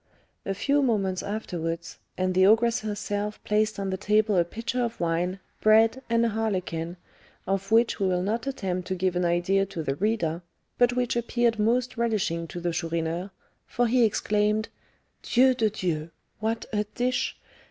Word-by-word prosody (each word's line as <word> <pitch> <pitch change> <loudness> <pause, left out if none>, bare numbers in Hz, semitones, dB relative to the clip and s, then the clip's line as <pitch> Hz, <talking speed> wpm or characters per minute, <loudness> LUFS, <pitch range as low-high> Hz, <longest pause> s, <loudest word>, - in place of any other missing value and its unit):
A 195 - -1
few 285 +8 +2
moments 200 -8 +1
afterwards, 170 -5 -4 0.2
and 185 0 0
the 185 +1 +5
ogress 230 +2 +4
herself 210 0 -3
placed 215 +1 +1
on 195 -1 -2
the 190 - -1
table 210 +1 +2
a 175 - +4
pitcher 230 +7 -3
of 235 -1 -3
wine, 175 +3 -1 0.2
bread, 225 +4 +4
and 230 0 +3
a - - +2
harlequin, 185 -6 -2 0.5
of 195 +1 -2
which 230 +1 +3
we 195 - +2
will 180 -1 +1
not 225 +6 -2
attempt 185 -9 -3
to 190 - -1
give 185 0 0
an 180 0 +1
idea 175 +3 +2
to 175 -4 -5
the 135 - -1
reader, 175 -2 -1 0.4
but 245 0 +4
which 245 -1 0
appeared 235 -1 +1
most 245 +3 +1
relishing 200 -8 0
to 175 - -6
the 175 -1 -2
Chourineur; 165 +2 -2 0.4
for 245 - +1
he 240 +1 +3
exclaimed, 210 0 +1 0.5
"Dieu 260 +2 +4
de 225 -3 +1
Dieu! 170 -6 -2 0.3
what 225 +2 -2
a 210 0 +1
dish! 250 0 0
210 Hz, 170 wpm, -26 LUFS, 180-230 Hz, 0.5 s, the